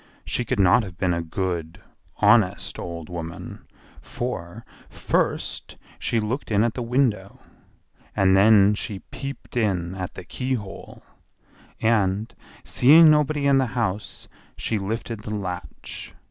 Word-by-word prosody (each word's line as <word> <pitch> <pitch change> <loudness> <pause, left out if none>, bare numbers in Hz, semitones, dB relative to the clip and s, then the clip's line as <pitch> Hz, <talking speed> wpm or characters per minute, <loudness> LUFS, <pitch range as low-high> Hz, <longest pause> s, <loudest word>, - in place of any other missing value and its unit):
She 125 - -1
could 125 -3 -1
not 95 +4 +5
have 95 -5 -9
been 90 -1 +1
a 85 - -1
good, 85 0 -3 0.4
honest, - - +3
old 85 -2 -6
woman; 85 -1 -7 0.3
for, 115 -3 -5 0.2
first, - - -2 0.2
she 115 - 0
looked 115 +7 -3
in 105 -1 +3
at 115 -2 +1
the 125 - -4
window, 115 -5 0 0.8
and 95 -1 +4
then 100 0 +6
she 100 -1 -4
peeped 140 -2 -7
in 95 -7 0
at 95 -1 -6
the - - -8
keyhole, 125 -7 -5 0.8
and, 110 -1 +1 0.3
seeing 155 +5 +7
nobody 150 -1 +2
in 140 -1 +5
the 130 - +1
house, 105 -3 -3 0.3
she 110 - -1
lifted 110 +3 -4
the 105 0 -5
latch. 90 -3 -6
105 Hz, 130 wpm, -24 LUFS, 95-120 Hz, 0.8 s, seeing